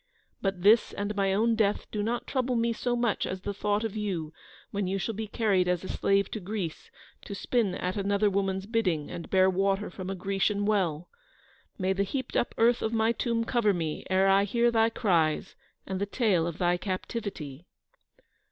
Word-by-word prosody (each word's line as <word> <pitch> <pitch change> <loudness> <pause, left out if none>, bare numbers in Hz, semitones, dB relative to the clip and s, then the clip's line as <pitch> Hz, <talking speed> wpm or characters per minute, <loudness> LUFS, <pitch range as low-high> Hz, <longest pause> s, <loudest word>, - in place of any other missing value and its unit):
But 195 -3 -2
this 215 +3 +5
and 205 +1 -3
my 195 -1 +1
own 225 +4 +2
death 210 -2 +1
do 210 - -2
not 235 +3 -2
trouble 255 -2 -1
me 230 0 +1
so 245 +1 -1
much 235 -3 0
as 185 0 -4
the 205 - -3
thought 205 +1 0
of 220 -2 -3
you, 180 -7 -3 0.4
when 200 -2 -1
you 195 +1 -1
shall 225 +4 -2
be 220 +1 -4
carried 200 -5 +1
as 180 0 0
a - - -6
slave 200 0 +1
to 220 - -3
Greece, 190 -4 -5 0.4
to 200 - -6
spin 210 -3 0
at 180 0 -2
another 200 +1 +1
woman's 195 -1 0
bidding, 190 -9 0
and 170 - -7
bear 190 -1 +4
water 195 +1 +1
from 185 0 -6
a 195 - -2
Grecian 195 +2 0
well. 180 -6 0 0.7
May 190 -1 +1
the 195 - -1
heaped 260 +6 -3
up 240 - 0
earth 235 +1 +4
of 220 - -1
my 225 0 +3
tomb 235 0 0
cover 225 -4 +2
me 160 -3 -3
ere 190 +1 +3
I 195 +1 +5
hear 235 +3 +2
thy 225 -1 +3
cries 170 -9 +1 0.3
and 190 0 -4
the 200 - 0
tale 195 -7 +1
of 170 -1 -5
thy 175 -1 +2
captivity." 185 - -5
200 Hz, 200 wpm, -28 LUFS, 185-225 Hz, 0.7 s, this